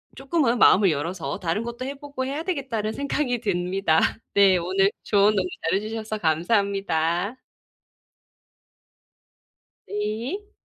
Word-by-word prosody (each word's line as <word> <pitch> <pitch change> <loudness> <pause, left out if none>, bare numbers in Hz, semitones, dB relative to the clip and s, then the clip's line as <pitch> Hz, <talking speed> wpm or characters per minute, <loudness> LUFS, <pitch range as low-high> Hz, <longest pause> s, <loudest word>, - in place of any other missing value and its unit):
조금은 270 -4 0
마음을 195 -2 +6
열어서 155 0 -3
'다른 175 +5 -1
것도 235 +2 -6
해보고 280 -1 -5
해야 285 +4 -3
되겠다.'는 260 - -2
생각이 280 -3 -1
듭니다. 180 -4 +1 0.3
네 195 -2 +6
오늘 190 +3 +1
조언 205 0 +3
너무 185 -2 +1 0.2
잘해주셔서 215 +3 -2
감사합니다. 180 +1 0 2.5
네. 230 - -4
210 Hz, 260 characters per minute, -24 LUFS, 185-255 Hz, 2.5 s, 마음을